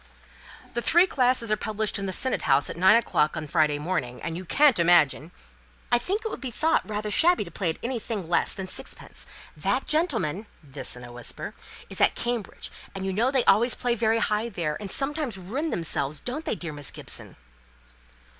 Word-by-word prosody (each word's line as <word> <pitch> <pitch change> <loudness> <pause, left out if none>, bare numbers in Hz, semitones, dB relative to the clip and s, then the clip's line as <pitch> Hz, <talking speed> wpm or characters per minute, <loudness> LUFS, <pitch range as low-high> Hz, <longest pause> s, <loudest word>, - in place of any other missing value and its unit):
"The 240 - -1
three 345 +8 +5
classes 250 - +1
are - - +4
published 215 -1 -2
in 195 - -3
the - - -2
Senate 260 +7 0
House 135 +1 +2
at - - -7
nine 185 +5 +6
o'clock 165 -9 +1
on 155 - -3
the 150 - -9
Friday 155 -3 +3
morning, 145 -6 -3
and 165 - -3
you 185 +2 -6
can't 280 - +4
imagine 165 -3 +4 0.3
" 60 - -31
"I 240 - +5
think 400 - -3
it - - 0
will - - -5
be 265 - -5
thought 315 +7 +1
rather 210 0 -3
shabby 345 - +4
to 170 - -11
play 180 +1 -1
at 160 - -2
anything 230 -6 -3
less 170 - +2
than 190 -1 -5
sixpence. 185 - -7 0.3
That - - -1
gentleman" 225 - 0 0.2
(this 140 -2 -2
in 125 - -11
a 120 - -10
whisper) 120 -1 -6 0.3
"is - - -6
at - - +5
Cambridge, 240 -3 -3 0.2
and 190 0 -4
you 190 - -1
know 230 +6 +2
they 265 -2 +1
always 230 +5 +4
play 245 -1 0
very 225 -1 +2
high 215 +1 0
there, 165 -7 -2
and 205 -2 -6
sometimes 275 -4 0
ruin 245 - -3
themselves, 155 - 0
don't 260 - -5
they, - - -1
dear 165 -6 -5
Miss 145 -1 -5
Gibson?" - - -5
210 Hz, 205 wpm, -26 LUFS, 165-245 Hz, 0.3 s, nine